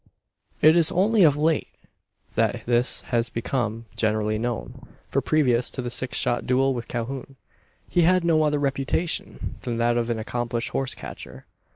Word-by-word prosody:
It 155 +2 +7
is 170 0 +4
only 205 +4 +3
of 150 -5 +5
late 155 +1 +1 0.7
that - - 0
this 120 +1 +3
has 115 0 +2
become 115 -1 -2
generally 110 -1 0
known: 120 +2 -5 0.2
for 140 - +1
previous 125 -6 +2
to - - -5
the 120 - -4
six 125 +1 -1
shot 120 - 0
duel 135 +2 +2
with 120 -2 -5
Calhoun, 130 +3 -5 0.5
he 175 - +2
had 180 +1 +4
no 165 -2 +3
other 150 -1 +2
reputation 140 +4 -2
than 120 -2 -3
that 120 +1 +2
of 120 0 -1
an 115 - 0
accomplished 120 +1 -3
horse 135 -1 -2
catcher. - - -10
125 Hz, 165 wpm, -24 LUFS, 120-150 Hz, 0.7 s, It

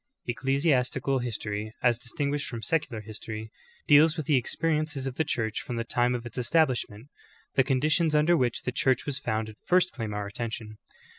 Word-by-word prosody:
Ecclesi 135 +6 +1
astical 130 0 +1
history, 110 -2 -4
as 120 -2 +3
distinguished 140 +3 -2
from 115 -2 -6
secular 145 -9 -1
history, 110 0 -7 0.3
deals 155 +2 +6
with 155 - -3
the 155 - +3
experiences 155 +2 0
of 135 - -2
the 160 - 0
Church 110 -6 -1
from 125 - -5
the 115 - -1
time 120 +1 +1
of 120 -1 -5
its 120 +1 -6
establishment. 125 -4 +1 0.4
The 135 - +4
conditions 150 +4 +2
under 155 +3 +4
which 125 -6 0
the 125 - -1
Church 130 0 +1
was 140 -2 -3
founded 110 -1 -3
first 185 0 +3
claim 115 -4 -4
our 105 0 -3
attention. 110 +1 -5
125 Hz, 175 wpm, -28 LUFS, 115-145 Hz, 0.4 s, deals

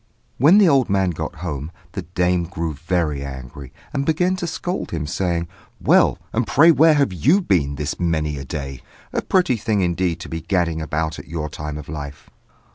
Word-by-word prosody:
When 155 - +7
the 205 -3 +6
old 135 -6 +3
man 95 -2 +2
got 80 - -5
home, 75 -1 -4 0.2
the 95 - -4
dame 90 0 0
grew 85 -2 -3
very 75 -2 -1
angry, 65 0 -8 0.2
and 140 -1 0
began 180 +5 +1
to 175 - -3
scold 180 +2 -3
him, 80 -3 -3
saying, 85 +2 -1 0.3
"Well, - - +4 0.2
and 115 0 0
pray 155 +10 +6
where 160 0 +5
have 140 -9 +2
you 140 - +3
been 80 - +1
this 75 +1 -4
many 80 -4 0
a - - -5
day? 70 -1 -6 0.3
A - - 0
pretty 180 -10 +2
thing, 110 -2 0
indeed, 85 -1 0
to - - -7
be 80 0 -5
gadding 85 -3 0
about 80 0 -2
at - - -11
your 75 -2 -4
time 75 0 -6
of 75 - -9
life!" 70 -1 -8
85 Hz, 195 wpm, -21 LUFS, 75-115 Hz, 0.3 s, When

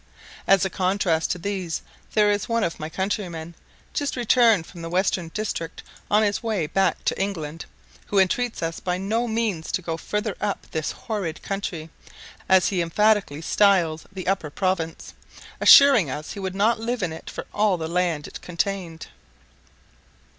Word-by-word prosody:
As 195 -1 +5
a 190 - -2
contrast 185 -4 +1
to - - -1
these 185 -2 -3 0.3
there 210 -1 +5
is 205 +1 -1
one 230 -1 +1
of 170 - -2
my 155 0 -5
countrymen, 175 -3 -3 0.4
just 285 -1 -1
returned 235 -6 +4
from 170 0 -11
the 165 - -5
western 185 -1 0
district 165 -3 -4 0.3
on 210 +1 +4
his 205 -2 0
way 215 -8 -1
back 185 +3 0
to - - 0
England, 165 -5 -4 0.4
who 205 - -1
entreats 220 +3 +1
us 165 0 -3
by 180 -1 -2
no 220 +6 -1
means 220 -8 -1
to - - 0
go 165 -1 -3
further 210 +4 -3
up 205 -1 -2
this 155 -1 -2
horrid 195 -8 -4
country, 175 -5 -4 0.6
as 190 -1 +5
he 185 -3 0
emphatically 195 -3 +2
styles 175 -7 +3
the 190 -2 -7
Upper 185 -5 0
Province, 165 0 -2 0.5
assuring 270 - +8
us 150 +4 -5
he - - -7
would 190 -1 -4
not 220 +3 +2
live 235 -1 -2
in 165 -3 -1
it 160 - -9
for - - -6
all 205 -3 +2
the 160 -1 -4
land 170 -3 0
it - - -10
contained. 175 -2 -3
190 Hz, 170 wpm, -24 LUFS, 165-210 Hz, 0.6 s, assuring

